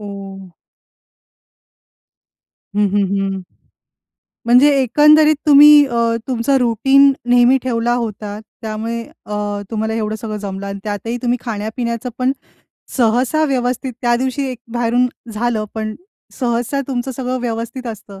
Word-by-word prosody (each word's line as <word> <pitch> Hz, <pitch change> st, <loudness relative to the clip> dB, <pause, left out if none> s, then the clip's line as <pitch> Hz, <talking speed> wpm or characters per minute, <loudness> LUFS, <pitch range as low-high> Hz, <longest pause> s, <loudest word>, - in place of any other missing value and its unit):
ओ. 195 Hz, -2 st, -9 dB, 2.3 s
हं, 210 Hz, 0 st, +2 dB
हं, 205 Hz, -1 st, +2 dB
हं. 195 Hz, -1 st, -2 dB, 1.1 s
म्हणजे 250 Hz, +5 st, +6 dB
एकंदरीत 300 Hz, +4 st, +5 dB
तुम्ही 295 Hz, +1 st, +8 dB
अ, 235 Hz, -2 st, 0 dB
तुमचं 255 Hz, +2 st, +1 dB
रूटीन 270 Hz, +4 st, +4 dB, 0.2 s
नेहमी 245 Hz, +2 st, +5 dB
ठेवला 240 Hz, -1 st, 0 dB
होता. 210 Hz, -3 st, -4 dB, 0.2 s
त्यामुळे 225 Hz, +2 st, -4 dB, 0.2 s
अ, 210 Hz, -, -5 dB, 0.4 s
तुम्हाला 220 Hz, 0 st, -2 dB
एवढं 215 Hz, -1 st, -2 dB
सगळं 215 Hz, -1 st, -5 dB
जमलं 200 Hz, -1 st, -6 dB
आणि 200 Hz, 0 st, -5 dB
त्यातही 215 Hz, +3 st, -3 dB
तुम्ही 245 Hz, 0 st, 0 dB
खाण्या-पिण्याचं 230 Hz, +2 st, -3 dB
पण 255 Hz, +1 st, +1 dB, 0.6 s
सहसा 250 Hz, +6 st, +2 dB
व्यवस्थित, 255 Hz, -2 st, -1 dB
त्या 240 Hz, 0 st, +3 dB
दिवशी 265 Hz, +2 st, -2 dB
एक 250 Hz, -, -7 dB
बाहेरून 240 Hz, +1 st, +1 dB, 0.3 s
झालं. 220 Hz, 0 st, -1 dB
पण 215 Hz, -1 st, -3 dB, 0.4 s
सहसा 245 Hz, +2 st, -1 dB
तुमचं 255 Hz, 0 st, -2 dB
सगळं 255 Hz, 0 st, -3 dB
व्यवस्थित 235 Hz, +2 st, -4 dB
असतं. 210 Hz, -3 st, -8 dB
235 Hz, 120 wpm, -18 LUFS, 215-255 Hz, 2.3 s, तुम्ही